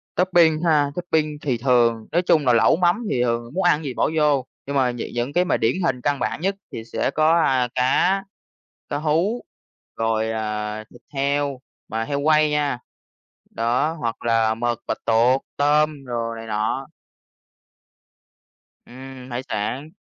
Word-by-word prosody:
Topping 175 Hz, -4 st, +3 dB
ha? 150 Hz, -4 st, +3 dB
Topping 160 Hz, -4 st, -1 dB
thì 130 Hz, -5 st, -1 dB
thường 115 Hz, -2 st, +2 dB
nói 175 Hz, -, +2 dB
chung 160 Hz, -4 st, +2 dB
là 125 Hz, -, +4 dB
lẩu 115 Hz, -, +5 dB
mắm 180 Hz, +7 st, +1 dB
thì 125 Hz, -, +1 dB
thường 120 Hz, +1 st, -2 dB
muốn 190 Hz, +3 st, -1 dB
ăn 175 Hz, -4 st, +4 dB
cái -, -, -10 dB
gì 135 Hz, -4 st, -4 dB
bỏ -, -, +1 dB
vô, 145 Hz, -4 st, +2 dB, 0.2 s
nhưng 140 Hz, -, -4 dB
mà 130 Hz, -2 st, +2 dB
nh -, -, -8 dB, 0.2 s
những 120 Hz, +4 st, -2 dB
cái 180 Hz, +1 st, +2 dB
mà -, -, +1 dB
điển 115 Hz, +2 st, +1 dB
hình 125 Hz, -5 st, 0 dB
căn 145 Hz, +2 st, 0 dB
bản 145 Hz, -, -2 dB
nhất 195 Hz, +3 st, 0 dB, 0.2 s
thì 110 Hz, -, -6 dB
sẽ -, -, 0 dB
có, 155 Hz, +2 st, +3 dB
a, 130 Hz, -5 st, +2 dB
cá, 180 Hz, +10 st, +2 dB, 0.7 s
cá -, -, -2 dB
hú, 165 Hz, +10 st, 0 dB, 0.5 s
rồi, 110 Hz, 0 st, 0 dB
à, 105 Hz, -1 st, -3 dB
thịt 120 Hz, -, -16 dB
heo 140 Hz, -1 st, -1 dB, 0.3 s
mà 115 Hz, 0 st, -2 dB
heo 140 Hz, +5 st, -2 dB
quay 155 Hz, +1 st, +3 dB
nha. 145 Hz, -4 st, 0 dB, 0.7 s
Đó, 120 Hz, +7 st, 0 dB
hoặc 115 Hz, -1 st, -3 dB
là 115 Hz, -1 st, +2 dB
mực, 120 Hz, 0 st, -1 dB
bạch -, -, -2 dB
tuột, 120 Hz, +4 st, +3 dB, 0.2 s
tôm 150 Hz, 0 st, +2 dB
đồ 115 Hz, -2 st, -3 dB
này 115 Hz, 0 st, -8 dB
nọ. 110 Hz, +5 st, -2 dB, 2.0 s
Ừm, 130 Hz, 0 st, -11 dB
hải 120 Hz, +1 st, -3 dB
sản. 125 Hz, +8 st, -3 dB
135 Hz, 170 wpm, -22 LUFS, 115-155 Hz, 2.0 s, lẩu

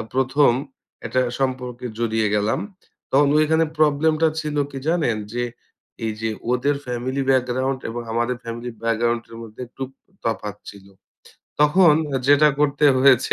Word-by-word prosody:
আ -, -, -2 dB
প্রথম 135 Hz, +1 st, +3 dB, 0.5 s
একটা 130 Hz, -, +1 dB, 0.2 s
সম্পর্কে 125 Hz, -2 st, -3 dB
জড়িয়ে 110 Hz, -2 st, +1 dB
গেলাম 105 Hz, +1 st, +1 dB, 0.5 s
তখন 140 Hz, +1 st, +5 dB
ওইখানে 160 Hz, +1 st, +3 dB
প্রবলেমটা 155 Hz, +1 st, +3 dB
ছিল 150 Hz, -1 st, -4 dB
কি 135 Hz, -, -6 dB
জানেন? 160 Hz, -9 st, +1 dB, 0.2 s
যে 120 Hz, -, 0 dB, 0.6 s
এই 110 Hz, -, -1 dB
যে 110 Hz, -, -1 dB, 0.2 s
ওদের 140 Hz, +3 st, +1 dB
ফ্যামিলি 125 Hz, +3 st, -2 dB
ব্যাকগ্রাউন্ড 130 Hz, +1 st, +1 dB
এবং 120 Hz, -, -4 dB
আমাদের 120 Hz, +2 st, 0 dB
ফ্যামিলি 120 Hz, +1 st, -6 dB
ব্যাকগ্রাউন্ডের 115 Hz, 0 st, -1 dB
মধ্যে 110 Hz, +1 st, -11 dB
একটুক 130 Hz, +2 st, -7 dB, 0.3 s
তফাৎ 105 Hz, -2 st, -2 dB
ছিল। 100 Hz, -1 st, -15 dB, 0.7 s
তখন 150 Hz, +2 st, +6 dB, 0.3 s
যেটা 145 Hz, +1 st, +6 dB
করতে 145 Hz, 0 st, +3 dB
হয়েছে 130 Hz, -2 st, +5 dB
130 Hz, 135 wpm, -22 LUFS, 115-145 Hz, 0.7 s, তখন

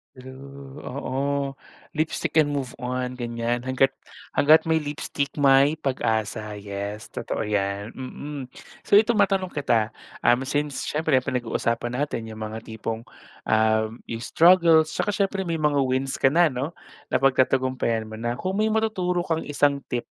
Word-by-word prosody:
True, 135 Hz, +2 st, -11 dB
oo, 140 Hz, +1 st, -2 dB, 0.4 s
lipstick 160 Hz, 0 st, -1 dB
and 145 Hz, -2 st, +4 dB
move 135 Hz, -3 st, -4 dB
on, 125 Hz, 0 st, -3 dB
ganiyan, 120 Hz, 0 st, -2 dB
hangga't 130 Hz, +1 st, +3 dB, 0.5 s
hangga't 155 Hz, +2 st, +7 dB
may 160 Hz, -, +4 dB
lipstick, 145 Hz, -1 st, -3 dB
may 140 Hz, +1 st, +6 dB
pag-asa, 110 Hz, -7 st, -2 dB
yes, 100 Hz, +1 st, -6 dB
totoo -, -, -4 dB
yan, 100 Hz, 0 st, -1 dB
mm. 135 Hz, +1 st, -6 dB, 0.4 s
So, -, -, -4 dB
ito 215 Hz, +2 st, +6 dB
matanong 195 Hz, -2 st, +2 dB
kita, 115 Hz, -8 st, +1 dB, 0.3 s
um, 120 Hz, +2 st, +3 dB
since, 145 Hz, 0 st, -2 dB
siyempre 155 Hz, -3 st, +1 dB
pinag-uusapan 120 Hz, -2 st, -1 dB
natin 120 Hz, -6 st, -3 dB
yung 110 Hz, 0 st, -6 dB
mga 110 Hz, +1 st, -6 dB
tipong, 110 Hz, 0 st, -5 dB, 0.5 s
ah, 110 Hz, 0 st, +3 dB, 0.2 s
yung 115 Hz, 0 st, -5 dB
struggle, 165 Hz, +1 st, +5 dB
'tsaka 180 Hz, -, -2 dB
siyempre 195 Hz, -1 st, 0 dB
may 165 Hz, -, 0 dB
mga 150 Hz, -2 st, +2 dB
wins 130 Hz, +1 st, 0 dB
ka 135 Hz, -, +6 dB
na, 170 Hz, +4 st, +4 dB
'no, 140 Hz, +3 st, -3 dB, 0.3 s
napagtatagumpayan 130 Hz, -3 st, +2 dB
mo 110 Hz, -, -10 dB
na. 120 Hz, +2 st, -3 dB
Kung 185 Hz, +1 st, -3 dB
may 220 Hz, -, +2 dB
matuturo 190 Hz, -5 st, 0 dB
kang 165 Hz, -1 st, -1 dB
isang 145 Hz, -1 st, +1 dB
tip, 120 Hz, -2 st, -2 dB
135 Hz, 145 wpm, -24 LUFS, 115-150 Hz, 0.5 s, hangga't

